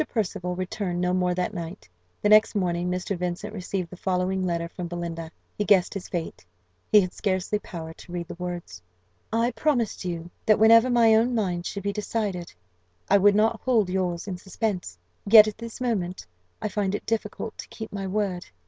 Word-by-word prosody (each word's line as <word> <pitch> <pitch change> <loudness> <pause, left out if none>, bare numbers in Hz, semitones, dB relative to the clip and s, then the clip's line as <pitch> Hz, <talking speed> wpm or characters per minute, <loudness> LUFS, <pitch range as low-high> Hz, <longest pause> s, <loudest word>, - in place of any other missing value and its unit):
Percival 180 -5 -2
returned 185 0 -3
no 180 0 +1
more 180 -1 +1
that 180 +3 -1
night. 170 - -7 0.4
The 210 - +3
next 215 +1 +6
morning 175 -2 0
Mr. 180 +2 -2
Vincent 180 +4 -4
received 185 -3 -4
the - - -8
following 185 0 0
letter 170 -2 -1
from 175 +1 -6
Belinda. 170 -1 -5 0.3
He 210 - -1
guessed 195 -3 +4
his 195 -3 -6
fate: 170 -2 -4 0.5
he 210 - +8
had 185 -1 -3
scarcely 195 +1 -1
power 160 -5 -8
to 175 - -14
read 175 -1 -4
the - - -6
words. 175 - -6 0.5
"I 230 +2 +2
promised 240 -3 0
you 170 -1 -4 0.2
that, 215 - +6
whenever 230 +3 +7
my 235 -2 +5
own 235 +3 +3
mind 180 -5 -1
should 200 - -5
be 200 0 -1
decided, 205 -4 -3 0.6
I 200 - +7
would 200 +1 +5
not 220 +1 +2
hold 220 -8 +2
yours 180 -1 -1
in 185 -2 -4
suspense; 190 - -3 0.3
yet 215 0 +10
at 215 0 -5
this 230 0 -7
moment 190 - -2 0.4
I - - +1
find 200 -1 -1
it - - -6
difficult 220 0 -3
to - - -7
keep 220 -2 -8
my 195 -1 -3
word. 190 -2 -2
190 Hz, 190 wpm, -26 LUFS, 180-215 Hz, 0.6 s, yet